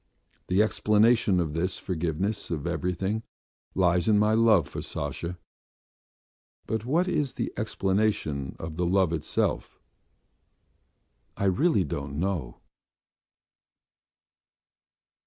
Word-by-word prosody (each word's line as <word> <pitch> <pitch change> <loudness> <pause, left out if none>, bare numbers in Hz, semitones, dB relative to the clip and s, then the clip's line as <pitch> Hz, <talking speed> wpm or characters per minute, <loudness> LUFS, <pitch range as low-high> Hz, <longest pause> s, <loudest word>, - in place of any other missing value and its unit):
The 95 +3 +4
explanation 105 -2 +3
of 80 -4 -1
this 90 +3 -1
forgiveness 90 +4 -2
of 75 -4 -3
everything 90 +5 -1 0.5
lies 90 -2 +2
in 105 -1 +5
my 105 +1 +3
love 110 -8 +4
for - - -6
Sasha, 85 +1 -5 1.3
but 110 0 -2
what 165 +8 +2
is 150 -7 0
the - - -3
explanation 95 -9 -1
of 80 -1 -7
the 90 - 0
love 95 -2 +2
itself, 80 - -1 1.6
I - - -2
really 100 - +3
don't 70 -1 -4
know. 85 -9 -2
95 Hz, 100 wpm, -27 LUFS, 85-110 Hz, 1.6 s, in